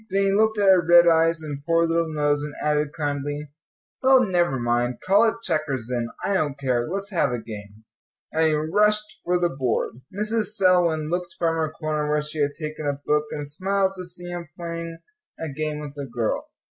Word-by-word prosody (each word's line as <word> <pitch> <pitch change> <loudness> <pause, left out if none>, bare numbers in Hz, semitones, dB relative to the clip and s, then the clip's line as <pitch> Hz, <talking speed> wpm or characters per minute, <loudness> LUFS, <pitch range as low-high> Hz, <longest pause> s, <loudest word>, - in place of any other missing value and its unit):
Then 195 +1 +1
he 195 - +2
looked 220 +1 +3
at 205 - +1
her 185 -2 +6
red 170 +1 +7
eyes 165 0 +3
and 145 -2 -6
poor 165 +2 +3
little 165 0 0
nose, 145 -1 +1
and 150 0 -6
added 150 -1 0
kindly, 145 -1 -3 0.5
"Well, 260 -1 +6
never 175 - +1
mind, 120 +1 0
call 200 +4 +4
it - - -4
checkers, 145 - -1
then, 120 -2 -1 0.2
I 200 - 0
don't 150 -7 0
care; 125 -3 0
let's 195 +3 -3
have 165 -8 +1
a 120 - -1
game," 105 -2 -10 0.5
and 160 0 +2
he 155 - +2
rushed 210 +7 +1
for 180 +1 +1
the 175 -1 +2
board. 130 -2 -2
Mrs. 215 +1 -1
Selwyn 175 -5 +3
looked 175 -1 -3
from 165 -1 +1
her 160 -1 0
corner 155 -1 -2
where 150 0 +1
she 150 +1 -3
had 145 0 +1
taken 155 -1 -4
a 140 -1 -1
book, 150 0 +2
and 145 -1 -5
smiled 190 +5 0
to 185 - -6
see 175 0 -9
him 175 -2 -6
playing 170 -1 -5 0.4
a 160 - -4
game 155 +1 -3
with 150 -1 -7
a 140 - -4
girl. 120 -3 -2
155 Hz, 205 wpm, -24 LUFS, 145-180 Hz, 0.5 s, red